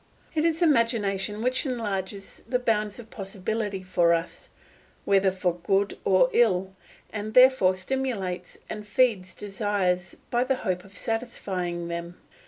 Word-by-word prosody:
It 310 Hz, 0 st, +1 dB
is 330 Hz, +1 st, +2 dB
imagination 220 Hz, -, +1 dB
which 255 Hz, +1 st, +1 dB
enlarges 205 Hz, -, -4 dB
the 250 Hz, -, +2 dB
bounds 215 Hz, -4 st, 0 dB
of 225 Hz, -2 st, -11 dB
possibility 200 Hz, -1 st, -3 dB
for 175 Hz, -2 st, +3 dB
us, 165 Hz, +2 st, -6 dB, 0.6 s
whether 195 Hz, -1 st, +4 dB
for 185 Hz, -2 st, -1 dB
good 195 Hz, +3 st, +1 dB
or 195 Hz, +7 st, +4 dB
ill, 190 Hz, -5 st, +2 dB, 0.4 s
and 215 Hz, 0 st, -5 dB
therefore 255 Hz, -8 st, +6 dB
stimulates 195 Hz, -3 st, -3 dB
and 210 Hz, -1 st, -7 dB
feeds 210 Hz, -5 st, +1 dB
desires 195 Hz, -3 st, -1 dB, 0.2 s
by 240 Hz, 0 st, +3 dB
the 265 Hz, +1 st, +1 dB
hope 180 Hz, -1 st, -1 dB
of 195 Hz, 0 st, -16 dB
satisfying 185 Hz, -7 st, -3 dB
them. 170 Hz, +1 st, -5 dB
200 Hz, 135 wpm, -26 LUFS, 185-230 Hz, 0.6 s, therefore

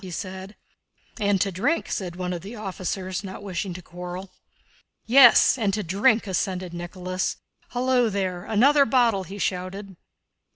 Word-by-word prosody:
said 190 Hz, +3 st, -7 dB, 0.6 s
he. 210 Hz, -, -1 dB
"And 200 Hz, -1 st, +3 dB
to 195 Hz, -, +1 dB
drink," 245 Hz, -, 0 dB
said 180 Hz, -3 st, -3 dB
one 180 Hz, 0 st, -3 dB
of 175 Hz, -, -5 dB
the 205 Hz, +6 st, -9 dB
officers, 190 Hz, -2 st, -4 dB
not 190 Hz, +1 st, -8 dB
wishing 190 Hz, -1 st, -4 dB
to 180 Hz, -, -9 dB
quarrel. 180 Hz, +2 st, -8 dB, 0.7 s
"Yes, 255 Hz, +1 st, +7 dB
and 205 Hz, -3 st, +1 dB
to 210 Hz, -, -2 dB
drink," 215 Hz, +6 st, +2 dB
assented 185 Hz, -2 st, -2 dB
Nicholas. 180 Hz, +1 st, -3 dB, 0.3 s
"Hullo 245 Hz, -1 st, +2 dB
there! 185 Hz, -3 st, -2 dB
Another 275 Hz, +7 st, +4 dB
bottle!" 230 Hz, -6 st, +2 dB
he 195 Hz, +4 st, -9 dB
shouted. 190 Hz, +1 st, -4 dB
195 Hz, 150 wpm, -24 LUFS, 185-215 Hz, 0.7 s, Yes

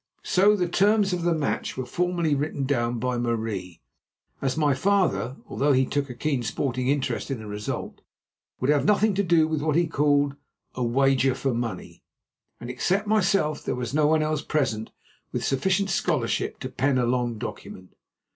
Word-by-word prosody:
So 200 Hz, +3 st, +4 dB
the 180 Hz, -3 st, 0 dB
terms 200 Hz, +2 st, +3 dB
of 180 Hz, -, -1 dB
the 170 Hz, 0 st, +2 dB
match 150 Hz, -4 st, -2 dB
were 130 Hz, -, -3 dB
formally 175 Hz, +1 st, 0 dB
written 145 Hz, 0 st, -1 dB
down 120 Hz, -3 st, 0 dB
by 125 Hz, +1 st, -1 dB
Marie, 110 Hz, -7 st, -3 dB, 0.6 s
as 135 Hz, 0 st, -1 dB
my 150 Hz, -3 st, +3 dB
father, 185 Hz, -5 st, +1 dB
although 145 Hz, +1 st, +1 dB
he 130 Hz, 0 st, +3 dB
took 145 Hz, +1 st, -2 dB
a 125 Hz, -, -7 dB
keen 140 Hz, 0 st, -1 dB
sporting 125 Hz, +2 st, -2 dB
interest 140 Hz, +1 st, -1 dB
in 135 Hz, -, -2 dB
the 110 Hz, -, -9 dB
result, 105 Hz, 0 st, -5 dB, 0.6 s
would 130 Hz, +3 st, +2 dB
have 145 Hz, -2 st, +2 dB
nothing 210 Hz, 0 st, +3 dB
to 195 Hz, -, +1 dB
do 170 Hz, -4 st, +3 dB
with 155 Hz, -2 st, -1 dB
what 155 Hz, -1 st, 0 dB
he 170 Hz, +1 st, +3 dB
called 145 Hz, -2 st, +2 dB, 0.4 s
a 125 Hz, -, -3 dB
"wager 135 Hz, +1 st, +2 dB
for 135 Hz, -1 st, -1 dB
money," 115 Hz, -1 st, -5 dB, 0.6 s
and, 120 Hz, -, -8 dB
except 190 Hz, +11 st, 0 dB
myself, 195 Hz, -7 st, +1 dB
there -, -, -2 dB
was 125 Hz, -1 st, -4 dB
no 150 Hz, 0 st, +3 dB
one 155 Hz, 0 st, +3 dB
else 155 Hz, -1 st, -1 dB
present 125 Hz, -8 st, -1 dB, 0.4 s
with -, -, -2 dB
sufficient 190 Hz, +8 st, +1 dB
scholarship 155 Hz, -9 st, 0 dB
to 130 Hz, -, -4 dB
pen 135 Hz, +1 st, +1 dB
a 125 Hz, -, +2 dB
long 120 Hz, -1 st, 0 dB
document. 95 Hz, -3 st, -8 dB
140 Hz, 180 wpm, -25 LUFS, 125-170 Hz, 0.6 s, So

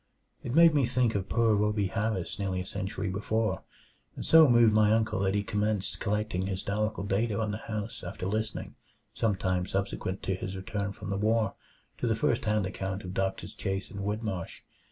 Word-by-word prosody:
It 125 Hz, -, -4 dB
made 165 Hz, -1 st, +8 dB
one 145 Hz, -2 st, +3 dB
think 120 Hz, -3 st, +2 dB
of 100 Hz, -2 st, -2 dB
poor 115 Hz, -2 st, +3 dB
Rhoby 105 Hz, -1 st, +1 dB
Harris 110 Hz, -4 st, -2 dB
nearly 95 Hz, -2 st, -1 dB
a 90 Hz, -, -4 dB
century 100 Hz, +1 st, -3 dB
before, 110 Hz, +3 st, -1 dB, 0.5 s
and -, -, -6 dB
so 160 Hz, -3 st, +8 dB
moved 120 Hz, -2 st, +6 dB
my 105 Hz, 0 st, +5 dB
uncle 110 Hz, -3 st, +2 dB
that 95 Hz, 0 st, +1 dB
he 100 Hz, -, +1 dB
commenced 105 Hz, -1 st, -1 dB
collecting 105 Hz, -2 st, -1 dB
historical 100 Hz, +2 st, -2 dB
data 100 Hz, +2 st, 0 dB
on 110 Hz, -2 st, 0 dB
the 105 Hz, -, -4 dB
house 110 Hz, 0 st, -5 dB
after 90 Hz, +1 st, -5 dB
listening, 110 Hz, +3 st, -2 dB, 0.4 s
some 110 Hz, -3 st, +1 dB
time 95 Hz, -1 st, -1 dB
subsequent 95 Hz, -1 st, -2 dB
to 95 Hz, -, 0 dB
his 95 Hz, +1 st, -4 dB
return 100 Hz, +1 st, -3 dB
from 100 Hz, 0 st, -7 dB
the 100 Hz, -, 0 dB
war, 110 Hz, 0 st, +2 dB, 0.5 s
to 120 Hz, -, 0 dB
the 110 Hz, -, +2 dB
first 115 Hz, +2 st, +1 dB
hand 105 Hz, -2 st, +2 dB
account 95 Hz, +1 st, -4 dB
of 90 Hz, 0 st, -6 dB
Doctors 95 Hz, +1 st, -2 dB
Chase 95 Hz, -1 st, -3 dB
and 100 Hz, -, -7 dB
Whitmarsh. 100 Hz, -3 st, -3 dB
105 Hz, 190 wpm, -29 LUFS, 95-110 Hz, 0.5 s, made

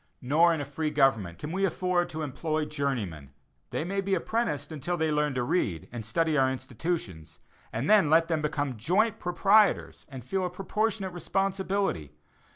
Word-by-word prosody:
Nor 160 Hz, +7 st, +4 dB
in 165 Hz, -, 0 dB
a 145 Hz, -, -3 dB
free 150 Hz, +3 st, -2 dB
government 115 Hz, -, +2 dB
can 150 Hz, -, -6 dB
we 190 Hz, +2 st, -1 dB
afford 180 Hz, -2 st, +1 dB
to 160 Hz, 0 st, -4 dB
employ 155 Hz, +2 st, -2 dB
journeymen; 115 Hz, -, -3 dB, 0.4 s
they -, -, -2 dB
may 195 Hz, +3 st, -1 dB
be 195 Hz, 0 st, 0 dB
apprenticed 220 Hz, -3 st, -2 dB
until 160 Hz, +4 st, -3 dB
they 160 Hz, -1 st, +1 dB
learn 150 Hz, -2 st, +1 dB
to 125 Hz, -, 0 dB
read, 120 Hz, -, -1 dB
and 120 Hz, -2 st, -6 dB
study 155 Hz, +8 st, 0 dB
our 130 Hz, 0 st, +3 dB
institutions; 120 Hz, -, -5 dB, 0.3 s
and 120 Hz, +6 st, -2 dB
then 210 Hz, -8 st, +5 dB
let 165 Hz, +1 st, +5 dB
them 160 Hz, -2 st, 0 dB
become 145 Hz, -4 st, -2 dB
joint 200 Hz, -, +1 dB
proprietors 200 Hz, +3 st, +2 dB
and 130 Hz, -5 st, -9 dB
feel 190 Hz, +6 st, -1 dB
a 180 Hz, -, -1 dB
proportionate 195 Hz, +1 st, -2 dB
responsibility. 190 Hz, -, -1 dB
155 Hz, 170 wpm, -28 LUFS, 130-185 Hz, 0.4 s, then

